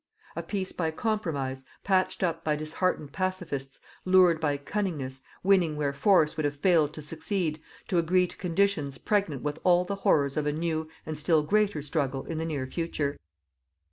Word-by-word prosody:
2. -, -, -4 dB
A -, -, -1 dB
peace 190 Hz, -2 st, -3 dB
by 165 Hz, -3 st, -1 dB
compromise, 160 Hz, -, -2 dB, 0.2 s
patched 185 Hz, -1 st, +1 dB
up 165 Hz, -2 st, 0 dB
by 155 Hz, -1 st, +1 dB
disheartened 155 Hz, 0 st, -1 dB
"pacifists," 180 Hz, -8 st, -3 dB, 0.2 s
lured 185 Hz, -3 st, +5 dB
by 145 Hz, -3 st, 0 dB
cunningness, 145 Hz, -6 st, -3 dB, 0.2 s
winning 185 Hz, -5 st, +3 dB
where 145 Hz, -2 st, 0 dB
force 160 Hz, +1 st, +3 dB
would 155 Hz, -, -2 dB
have 145 Hz, 0 st, 0 dB
failed 160 Hz, -2 st, +3 dB
to 155 Hz, -, -8 dB
succeed, 160 Hz, 0 st, -2 dB, 0.3 s
to 180 Hz, -, +2 dB
agree 180 Hz, +2 st, +3 dB
to -, -, -9 dB
conditions 170 Hz, -6 st, 0 dB
pregnant 195 Hz, -10 st, 0 dB
with 150 Hz, +1 st, -3 dB
all 180 Hz, 0 st, +4 dB
the 200 Hz, +2 st, -3 dB
horrors 140 Hz, -7 st, +2 dB
of 150 Hz, -1 st, 0 dB
a -, -, +2 dB
new 160 Hz, 0 st, -2 dB, 0.2 s
and 155 Hz, -1 st, -4 dB
still 155 Hz, -1 st, +3 dB
greater 200 Hz, -3 st, +1 dB
struggle 140 Hz, -3 st, -1 dB
in 160 Hz, -1 st, -4 dB
the 160 Hz, -, -2 dB
near 145 Hz, -5 st, -2 dB
future. 145 Hz, -1 st, -2 dB
160 Hz, 175 wpm, -28 LUFS, 145-185 Hz, 0.3 s, lured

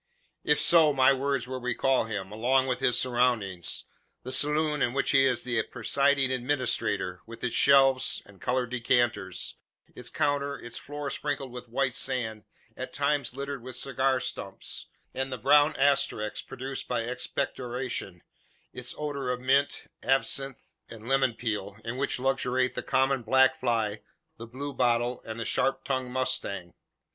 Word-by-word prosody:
If 150 Hz, -, +3 dB
so, 160 Hz, -3 st, +6 dB
my 135 Hz, 0 st, +5 dB
words 135 Hz, -2 st, -1 dB
will 130 Hz, 0 st, -5 dB
recall 125 Hz, +1 st, +1 dB
him, 100 Hz, -3 st, -5 dB
along 125 Hz, +5 st, +2 dB
with 125 Hz, -1 st, -1 dB
his 120 Hz, -1 st, +3 dB
surroundings 120 Hz, -9 st, 0 dB, 0.4 s
the 130 Hz, -, -6 dB
saloon 150 Hz, +2 st, +2 dB
in 120 Hz, -, +1 dB
which 135 Hz, 0 st, +1 dB
he 135 Hz, -1 st, +5 dB
is 125 Hz, -3 st, +1 dB
the 120 Hz, -3 st, +1 dB
presiding 140 Hz, +4 st, +1 dB
administrator, 125 Hz, -8 st, -1 dB
with 115 Hz, 0 st, -11 dB
its 125 Hz, -2 st, -1 dB
shelves 135 Hz, -1 st, +4 dB
and 100 Hz, -2 st, -18 dB
coloured 125 Hz, -1 st, -1 dB
decanters; 120 Hz, -5 st, 0 dB, 0.4 s
its -, -, -9 dB
counter; 140 Hz, -1 st, 0 dB
its 120 Hz, 0 st, -9 dB
floor 145 Hz, -1 st, -5 dB
sprinkled 140 Hz, -3 st, -3 dB
with 125 Hz, -1 st, -9 dB
white 130 Hz, +1 st, 0 dB
sand, 110 Hz, -5 st, -2 dB, 0.3 s
at -, -, -6 dB
times 140 Hz, -4 st, 0 dB
littered 140 Hz, -1 st, -5 dB
with 125 Hz, +1 st, -8 dB
cigar 130 Hz, 0 st, 0 dB
stumps, -, -, -5 dB, 0.3 s
and 130 Hz, 0 st, -2 dB
the 130 Hz, -, -3 dB
brown 150 Hz, +6 st, +5 dB
asterisks 135 Hz, -6 st, +1 dB
produced 135 Hz, +1 st, -6 dB
by 125 Hz, -2 st, 0 dB
expectoration 125 Hz, -5 st, -4 dB, 0.5 s
its -, -, -4 dB
odour 140 Hz, -3 st, -3 dB
of 125 Hz, 0 st, -1 dB
mint, 135 Hz, +3 st, +1 dB, 0.2 s
absinthe, 135 Hz, 0 st, -1 dB, 0.2 s
and 115 Hz, 0 st, -11 dB
lemon 135 Hz, -3 st, +2 dB
peel, 105 Hz, -4 st, -3 dB
in 115 Hz, +1 st, -3 dB
which 140 Hz, +1 st, 0 dB
luxuriate 130 Hz, -1 st, +1 dB
the -, -, -3 dB
common 135 Hz, 0 st, +1 dB
black 130 Hz, +3 st, +4 dB
fly, 115 Hz, -5 st, -1 dB, 0.4 s
the 115 Hz, -, -8 dB
blue 140 Hz, +4 st, -6 dB
bottle, 120 Hz, -1 st, +1 dB
and 110 Hz, 0 st, -5 dB
the 115 Hz, -, -3 dB
sharp 135 Hz, +1 st, 0 dB
tongued 130 Hz, -2 st, -2 dB
mosquito. 125 Hz, -8 st, -2 dB
130 Hz, 155 wpm, -28 LUFS, 120-135 Hz, 0.5 s, so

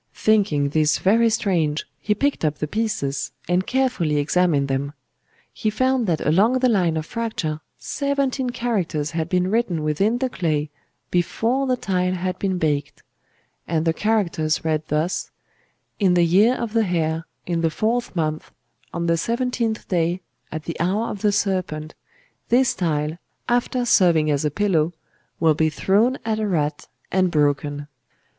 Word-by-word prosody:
Thinking 195 Hz, -10 st, +2 dB
this 150 Hz, 0 st, +2 dB
very 230 Hz, +4 st, +3 dB
strange, 175 Hz, -9 st, 0 dB
he 210 Hz, +7 st, 0 dB
picked 285 Hz, 0 st, 0 dB
up 150 Hz, -1 st, 0 dB
the -, -, -2 dB
pieces, 205 Hz, -9 st, -2 dB
and 180 Hz, +1 st, +1 dB
carefully 250 Hz, -, +1 dB
examined 150 Hz, -1 st, +2 dB
them. 140 Hz, +1 st, -2 dB, 0.6 s
He 215 Hz, -, -1 dB
found 255 Hz, +1 st, +1 dB
that 165 Hz, -3 st, 0 dB
along 205 Hz, +11 st, +3 dB
the 255 Hz, 0 st, +3 dB
line 180 Hz, -7 st, +2 dB
of 155 Hz, -, -3 dB
fracture 200 Hz, -9 st, -3 dB, 0.2 s
seventeen 280 Hz, -2 st, -1 dB
characters 195 Hz, -, -1 dB
had 165 Hz, 0 st, -2 dB
been 180 Hz, +1 st, +1 dB
written 205 Hz, -9 st, 0 dB
within 195 Hz, +10 st, +1 dB
the 260 Hz, +1 st, 0 dB
clay 155 Hz, -9 st, -1 dB, 0.4 s
before 230 Hz, +9 st, 0 dB
the 255 Hz, -1 st, +1 dB
tile 185 Hz, -3 st, 0 dB
had 185 Hz, 0 st, -3 dB
been 190 Hz, -2 st, 0 dB
baked; 145 Hz, -3 st, -1 dB, 0.6 s
and 160 Hz, -1 st, 0 dB
the 165 Hz, -, +2 dB
characters 170 Hz, -7 st, 0 dB
read 155 Hz, -1 st, +1 dB
thus: 155 Hz, +4 st, -1 dB, 0.7 s
'_In 190 Hz, -4 st, +3 dB
the 175 Hz, -1 st, +4 dB
Year 205 Hz, +9 st, +4 dB
of 235 Hz, -4 st, -4 dB
the 230 Hz, -, +3 dB
Hare, 160 Hz, -3 st, -1 dB, 0.2 s
in 170 Hz, -2 st, -1 dB
the 165 Hz, -, +2 dB
fourth 220 Hz, +8 st, -1 dB
month, 155 Hz, -2 st, -2 dB, 0.4 s
on 170 Hz, -, -3 dB
the 170 Hz, 0 st, +2 dB
seventeenth 235 Hz, +2 st, -1 dB
day, 175 Hz, 0 st, 0 dB, 0.3 s
at 155 Hz, 0 st, -5 dB
the 165 Hz, -, -6 dB
Hour 195 Hz, +7 st, 0 dB
of 200 Hz, -, -7 dB
the 210 Hz, -, +3 dB
Serpent, 180 Hz, -6 st, -1 dB, 0.6 s
this 250 Hz, +1 st, +4 dB
tile, 155 Hz, -1 st, -1 dB, 0.3 s
after 245 Hz, +1 st, +1 dB
serving 170 Hz, -9 st, +4 dB
as 145 Hz, 0 st, 0 dB
a 150 Hz, -, +2 dB
pillow, 175 Hz, -2 st, +1 dB, 0.5 s
will 160 Hz, -1 st, +4 dB
be 155 Hz, +1 st, +2 dB
thrown 210 Hz, -, +2 dB
at 220 Hz, -1 st, 0 dB
a 215 Hz, -, 0 dB
rat 155 Hz, -5 st, -1 dB, 0.2 s
and 185 Hz, -1 st, +2 dB
broken. 145 Hz, -1 st, 0 dB
180 Hz, 160 wpm, -22 LUFS, 155-220 Hz, 0.7 s, the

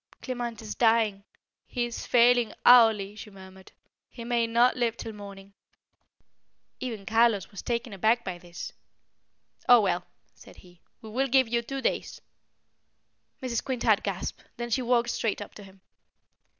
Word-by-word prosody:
"Clement 240 Hz, -3 st, -4 dB
is 215 Hz, -, -5 dB
dying. 225 Hz, -4 st, +2 dB, 0.4 s
He 245 Hz, -2 st, -2 dB
is 240 Hz, 0 st, -7 dB
failing 240 Hz, -2 st, +4 dB
hourly," 220 Hz, -5 st, +6 dB
she 215 Hz, -, -10 dB
murmured. 190 Hz, -1 st, -14 dB, 0.4 s
"He 235 Hz, -, -10 dB
may 235 Hz, -1 st, 0 dB
not 235 Hz, +2 st, +3 dB
live 240 Hz, -3 st, -1 dB
till 225 Hz, -, -7 dB
morning." 200 Hz, -1 st, -11 dB, 1.3 s
Even 225 Hz, -6 st, -5 dB
Carlos 225 Hz, -3 st, +2 dB
was 200 Hz, -, -8 dB
taken 235 Hz, -2 st, -3 dB
aback 220 Hz, +5 st, +2 dB
by 180 Hz, -2 st, -6 dB
this. 175 Hz, 0 st, -9 dB, 1.0 s
"Oh, 245 Hz, -1 st, +9 dB
well!" 185 Hz, -4 st, -1 dB, 0.3 s
said -, -, -16 dB
he, 175 Hz, -1 st, -19 dB, 0.2 s
"we 220 Hz, -, -9 dB
will 265 Hz, +4 st, 0 dB
give 260 Hz, -1 st, +3 dB
you 235 Hz, +1 st, 0 dB
two 270 Hz, +3 st, -6 dB
days." -, -, -2 dB, 1.2 s
Mrs. 235 Hz, -3 st, -2 dB
Quintard 235 Hz, -5 st, +1 dB
gasped, 195 Hz, -2 st, -5 dB
then 240 Hz, 0 st, -5 dB
she 255 Hz, -, +1 dB
walked 240 Hz, -1 st, +1 dB
straight 220 Hz, -3 st, -2 dB
up 205 Hz, -, -9 dB
to -, -, -12 dB
him. 190 Hz, -1 st, -17 dB
225 Hz, 150 wpm, -27 LUFS, 200-240 Hz, 1.3 s, Oh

